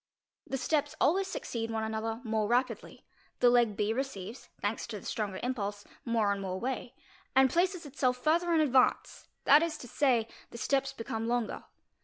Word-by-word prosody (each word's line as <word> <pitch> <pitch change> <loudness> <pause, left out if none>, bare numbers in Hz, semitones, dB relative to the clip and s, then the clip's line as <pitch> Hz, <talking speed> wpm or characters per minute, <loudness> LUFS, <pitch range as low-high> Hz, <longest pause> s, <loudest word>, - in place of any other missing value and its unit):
'The 270 - -2
ste 295 +3 0
always 375 +7 +3
succeed 230 -10 -4
one 220 -1 -2
another 220 +1 -3
more 220 -2 0
rapidly; 245 +3 -1 0.3
the 245 - +6
leg 235 -4 +3
B 210 +1 +1
receives, 240 -3 -5
that 205 +2 0
to 215 -3 -5
the - - -15
stronger 205 -4 -3
impulse, 205 -5 -3 0.2
more 225 -3 +2
and 200 0 -2
more 190 -1 -3
way, 255 +1 -4 0.4
and 265 0 +6
places 360 -1 +1
itself 255 -3 0
fur 310 +6 +3
a - - +4
in 315 - +4
advance, 265 -4 +2 0.2
that 290 +2 +7
is 330 -2 -1
to 245 - -10
say, 240 -3 +2 0.2
the - - -9
steps 270 +2 0
become 230 -3 -4
longer. 240 -2 -1
240 Hz, 180 wpm, -31 LUFS, 220-270 Hz, 0.4 s, that